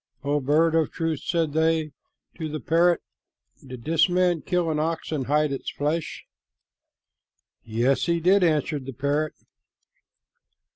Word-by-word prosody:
"O 145 +1 +1
bird 155 +4 +2
of 160 -1 +1
truth," 165 -2 -2
said 165 -4 -1
they 160 -1 +1 0.4
to 160 -1 -5
the 155 +1 -4
parrot, 170 +2 +2 0.6
"did 130 -3 -10
this 160 +4 +3
man 180 -2 +2
kill 175 -3 0
an 150 - -1
ox 160 +1 -2
and 140 -5 -2
hide 150 +1 +2
its 135 - -4
flesh?" 150 +3 -3 1.4
"Yes, 120 +7 0
he 170 0 +1
did," 185 +3 +4
answered 150 -4 0
the 135 - -5
parrot. 145 +4 -1
155 Hz, 140 wpm, -25 LUFS, 145-165 Hz, 1.4 s, did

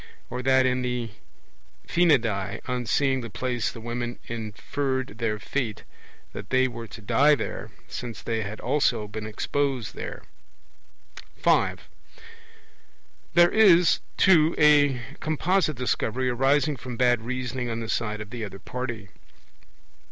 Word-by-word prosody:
Or 125 +1 -3
that 130 0 +4
in 125 0 +1
The 125 -2 -2 0.8
Phinidae: 115 - +2
on 125 -2 -2
seeing 135 0 +2
the 115 - -6
place 120 +1 -2
the 115 - -10
women 120 +1 -4
inferred 120 +3 -3
their 110 -2 0
fate, 110 0 -3 0.5
that - - -8
they 130 0 +3
were 115 -2 -7
to 110 +1 -11
die 135 +8 +4
there, 115 - -5 0.2
since 120 -2 -6
they 115 -1 -1
had 105 +1 -6
also 120 -7 +1
been 105 +1 -6
exposed 130 +2 -2
there. - - -7 1.1
(5) - - +1 1.5
There 175 0 +6
is, 180 -6 +6 0.2
too, 165 -4 +5
a 145 -3 +5 0.2
composite 155 0 +1
Discovery 125 0 -1
arising 135 +3 +2
from 125 0 -7
bad 120 -2 +3
reasoning 125 +1 -3
on 115 0 -3
the 115 - -5
side 105 -1 -2
of 105 +1 -9
the 120 -2 -5
other 100 -2 -6
party. 120 -2 -6
125 Hz, 135 wpm, -26 LUFS, 115-140 Hz, 1.5 s, There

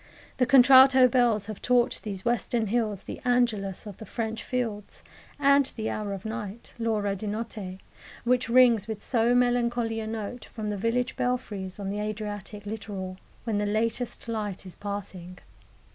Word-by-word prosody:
The 250 - +2
contralto 260 0 +8
bells 235 -5 +2
have 215 -1 -7
taught 245 -1 +2
these 200 -3 -6
Western 240 -1 +1
hills 215 -5 0
the - - -8
"Angelus" 230 -7 +1
of 205 -3 -8
the 220 - -9
French 225 -1 -3
fields, 225 -5 -3 0.3
and 280 -1 +5
the 220 -1 -2
hour 210 -1 -3
of 195 0 -6
night 220 -1 -6
l'ora 210 -3 0
di 210 +2 -5
notte 210 -3 -5 0.5
which 245 -1 +1
rings 235 -4 +5
with 220 -2 -5
so 240 -1 +2
melancholy 240 -2 +1
a 220 - -4
note 220 +2 -5
from 215 -2 -5
the 205 - -2
village 230 +4 -1
belfries 210 -7 -3
on 195 -1 -3
the 205 - -3
Adriatic 210 -1 -5
littoral, 200 -3 -6 0.3
when 220 -3 -1
the 205 - 0
latest 225 +3 -1
light 210 -4 -3
is 185 - -8
passing. 195 -3 -6
220 Hz, 160 wpm, -27 LUFS, 205-245 Hz, 0.5 s, contralto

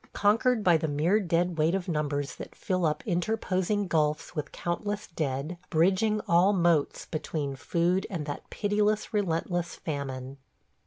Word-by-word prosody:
Conquered 220 +3 +3
by 175 -3 +5
the 160 - -2
mere 155 +8 +2
dead 175 -2 0
weight 160 +4 +3
of 195 -1 -3
numbers 145 -3 -1
that - - -9
fill 185 -3 0
up 150 - -2
interposing 200 0 0
gulfs 155 0 0
with 150 -2 -3
countless 205 +4 -3
dead, 155 +1 -3
bridging 190 +6 +2
all 175 +4 +5
moats 170 -5 +2
between 150 -3 -3
food 175 +6 0
and 170 -7 -3
that 145 - -6
pitiless, 210 +1 0
relentless 175 -3 -1
famine. 135 -3 -5
170 Hz, 145 wpm, -28 LUFS, 155-200 Hz, -, by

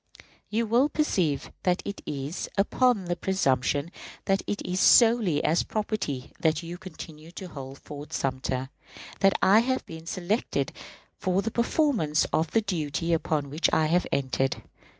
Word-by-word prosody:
You 225 +2 0
will 240 +6 +3
perceive 180 - 0
that 180 0 +1
it 200 - -5
is 145 +3 -4
upon 220 0 +2
the 175 0 -1
presumption 145 -4 0 0.3
that 195 0 +2
it 205 - -2
is 180 +1 -1
solely 225 -11 +5
as 165 +3 +3
property 205 - -3
that 160 +1 +1
you 170 +1 -7
continue 160 -4 -10
to 185 -1 -7
hold 135 -3 -8
Fort 145 +1 -9
Sumter 130 0 -2 0.5
that 195 0 +4
I 200 +3 +7
have 260 +3 0
been 160 0 -10
selected 185 +7 -1 0.5
for 185 +1 +1
the 225 - -2
performance 235 - +2
of 160 0 +2
the 225 - +2
duty 165 -4 -1
upon 150 -3 -1
which 155 +4 +1
I 160 - +3
have 175 +3 +2
entered. 135 -1 0
175 Hz, 150 wpm, -27 LUFS, 150-205 Hz, 0.5 s, I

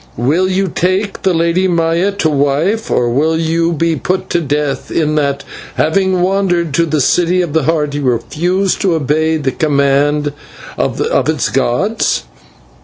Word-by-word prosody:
Will 155 +11 +1
you 190 +1 0
take 185 +4 -1
the 190 - +2
Lady 170 +2 +1
Maya 170 +2 +1
to 200 -5 0
wife, 155 +10 0
or 120 - +1
will 155 +6 +1
you 165 +1 0
be 165 0 0
put 185 +6 -2
to 175 - +1
death 145 -2 -2
in 155 -2 0
that, 140 -2 0 0.3
having 185 +3 +1
wandered 180 -4 0
to 170 +1 +2
the 155 -1 0
City 180 +6 +2
of 160 -4 -5
the 160 -4 +1
Heart, 150 -2 0
you 145 - -3
refuse 175 - 0
to 190 -5 +1
obey 155 +2 0
the 140 -3 -1
command 145 0 +1 0.4
of - - -2 0.3
its - - 0
gods?" - - 0
160 Hz, 160 wpm, -14 LUFS, 145-180 Hz, 0.4 s, the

